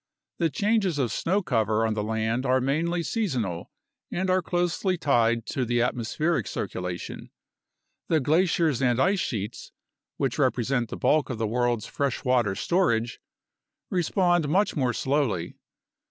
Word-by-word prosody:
The 165 -2 +2
changes 200 - +1
of 130 -5 0
snow 195 +4 0
cover 110 - +1
on 110 - 0
the 105 - -2
land 110 +3 -1
are 130 0 +2
mainly 165 +6 0
seasonal 125 - -2 0.4
and 185 +1 0
are 185 0 +3
closely 175 +2 0
tied 120 -7 +2
to 130 - 0
the 120 0 +1
atmospheric 125 - -1
circulation. 90 -1 -5 0.8
The 160 - +3
glaciers 160 -1 +2
and 125 -1 +2
ice 195 +7 +3
sheets 110 - -4 0.5
(which - - -1
represent 120 -1 +1
the - - -5
bulk 150 -5 +2
of 125 - -3
the 110 - -1
world's 120 0 0
freshwater 125 -6 0
storage) 120 - 0 0.7
respond 175 -2 +2
much 195 +6 +2
more 130 -5 +1
slowly. 130 - -1
130 Hz, 140 wpm, -26 LUFS, 115-170 Hz, 0.8 s, are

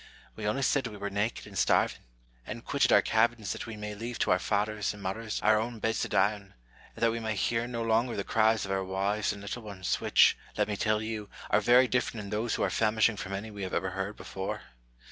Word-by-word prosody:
We 105 -1 -4
only 120 +6 0
said 135 -1 +2
we 105 -2 -8
were 100 0 -4
naked 105 +3 -1
and - - -12
starving, - - +2 0.5
and - - -7
quitted - - +2
our - - +6
cabins 110 -2 +1
that - - -5
we 110 -2 -7
may 105 0 -5
leave 115 +3 -5
to - - +2
our 90 - +4
fathers 105 +2 -1
and 100 - -11
mothers 110 +4 -3
our 110 0 +5
own 115 +1 -3
beds 110 0 -1
to - - -2
die 95 +4 +3
on, 105 - -9 0.5
and - - -5
that 115 - +5
we 115 - -3
may 110 -1 -2
hear 115 +4 0
no 115 -1 -3
longer 115 +1 +1
the 100 - -2
cries 110 -1 +2
of 95 - -5
our 95 0 0
wives 100 +3 0
and 100 -1 -8
little 105 +4 -5
ones, 100 -4 -3
which, - - +5 0.2
let - - +2
me 105 - -2
tell 110 +1 +1
you, 110 -2 -4 0.2
are 105 - +4
very 125 +4 +6
different 120 -3 -1
in 100 - -8
those 110 +2 0
who - - -1
are - - +1
famishing 110 0 +2
from 100 - -5
any 105 +3 -4
we 100 -1 -6
ever 95 0 -2
heard 95 +3 -3
before. 95 0 -5
110 Hz, 240 wpm, -29 LUFS, 100-115 Hz, 0.5 s, our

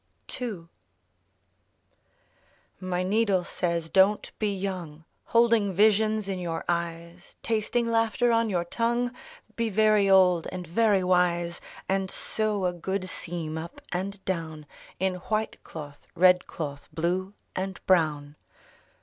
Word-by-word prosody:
11 210 -10 -5 2.1
My 185 -1 -2
needle 200 -1 +2
says: 170 -2 -2
Don't 195 +4 +3
be 210 -2 +1
young, 180 -6 -5 0.2
Holding 230 -4 +3
visions 215 +1 +3
in 190 -2 -2
your 170 -2 -4
eyes, 170 +1 -4
Tasting 230 +2 0
laughter 230 +1 +2
on 230 -1 +2
your 175 -3 0
tongue! 235 +5 0 0.2
— 220 - -24
Be 230 -1 0
very 215 -1 +4
old 180 -3 +5
and 185 -1 -5
very 200 +2 +2
wise, 175 -1 +1 0.3
And 190 0 0
sew 210 -2 -1
a 180 - +1
good 185 +2 -3
seam 165 -3 -5
up 165 +2 -8
and 195 +2 -4
down 160 -4 -3 0.3
In 190 0 0
white 220 0 -1
cloth, 145 -3 -10
red 180 +1 +5
cloth, 140 -3 -6
blue 185 +4 -1 0.2
and 190 0 -3
brown. 150 -5 +1
185 Hz, 125 wpm, -27 LUFS, 170-215 Hz, 2.1 s, old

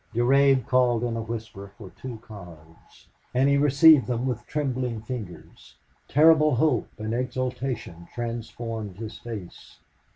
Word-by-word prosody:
Durade 135 +1 +4
called 125 -2 +2
in 120 -1 -2
a 115 - -3
whisper 110 -3 -7
for 100 -5 -11
two 125 +1 -8
cards, 85 -6 -14 0.3
and 130 +2 +3
he 140 - +4
received 145 0 +6
them 125 0 -2
with 120 -2 -3
trembling 130 -5 -2
fingers. 110 -7 -9 0.3
Terrible 155 -1 +5
hope 140 -2 +1
and 110 0 -4
exultation 125 -7 -4
transformed 115 -3 -5
his 110 0 -8
face. 105 -7 -9
120 Hz, 130 wpm, -25 LUFS, 110-130 Hz, 0.3 s, received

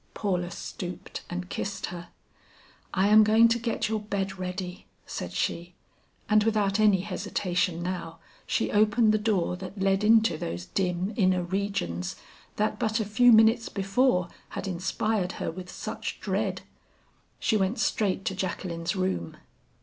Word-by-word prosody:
Paula 180 -4 -1
stooped 180 +1 -7
and 180 +1 -4
kissed 195 +1 -3
her. 175 0 -8 0.8
"I 195 +2 +2
am 215 +1 +8
going 220 +2 +6
to 235 +1 +1
get 230 0 -1
your 220 0 -1
bed 195 -2 -3
ready," 180 0 -5 0.2
said 90 - -5
she. 170 - -2 0.5
And 215 0 +4
without 210 -2 +1
any 205 -4 +5
hesitation 180 -2 -1
now, 175 -2 -4 0.3
she - - 0
opened 215 +1 +4
the 215 - +2
door 205 -5 +1
that 195 +2 -8
led 195 +1 +2
into 220 -5 +4
those 85 +1 -4
dim 185 - -1
inner 185 -4 +2
regions 175 - -2 0.4
that 215 +1 0
but 220 +1 +1
a 220 - 0
few 245 +4 +5
minutes 225 +1 +5
before 195 -1 +1 0.2
had - - -5
inspired 190 +2 -1
her - - -3
with 180 +1 -9
such - - -5
dread. - - -1 0.8
She 220 - +1
went 200 +2 +1
straight 195 -3 0
to - - 0
Jacqueline's 175 -1 -3
room. 185 - -2
195 Hz, 150 wpm, -27 LUFS, 180-215 Hz, 0.8 s, am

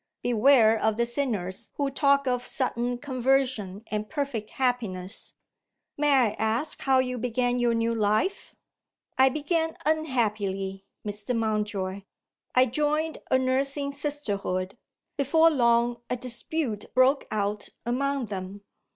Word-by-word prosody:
Beware 235 -2 +5
of 220 -1 +1
the 235 - +2
sinners 235 -8 -2
who 280 -1 -1
talk 280 0 +3
of 250 -1 -1
sudden 245 -1 -1
conversion 255 -6 0
and 215 0 -2
perfect 275 -8 -3
happiness. 225 -7 -2 0.6
May 295 0 +2
I 255 -6 +4
ask 225 +8 0
how 265 -1 +3
you 250 -1 0
began 245 +1 0
your 240 -1 +2
new 230 0 +1
life?" 215 - 0 0.6
"I 265 0 +7
began 320 +3 -1
unhappily, 210 -10 -1 0.2
Mr. 210 +3 -2
Mountjoy 210 -3 -1 0.5
I 255 0 +6
joined 300 +5 0
a 260 - +4
nursing 275 +2 0
Sisterhood. 205 -10 -2 0.4
Before 320 +4 +4
long, 235 -3 +2
a 250 - 0
dispute 245 -1 -4
broke 260 +2 +4
out 210 0 -2 0.2
among 275 +2 0
them. 195 0 -6
245 Hz, 125 wpm, -27 LUFS, 215-275 Hz, 0.6 s, I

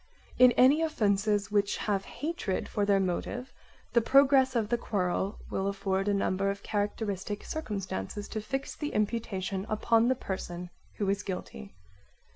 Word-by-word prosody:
In 250 -1 +9
any 270 +7 +5
offences 210 -8 +1
which 200 -1 +2
have 200 -2 -1
hatred 300 - -3
for 205 -1 -1
their 200 -1 +4
motive 195 +7 -2 0.4
the 235 - +5
progress 270 +1 +5
of 220 -3 +1
the 240 - +2
quarrel 195 -1 -1
will 190 0 -1
afford 195 0 -1
a 205 - +3
number 195 0 +1
of 200 0 -4
characteristic 205 -1 -2
circumstances 205 - -4
to 215 - -3
fix 270 +5 -4
the 295 -1 -4
imputation 205 -3 -1
upon 225 +2 +3
the 260 - +3
person 180 -5 -5 0.2
who 205 - -2
is 200 +1 +1
guilty. 95 - -7
205 Hz, 150 wpm, -29 LUFS, 195-235 Hz, 0.4 s, In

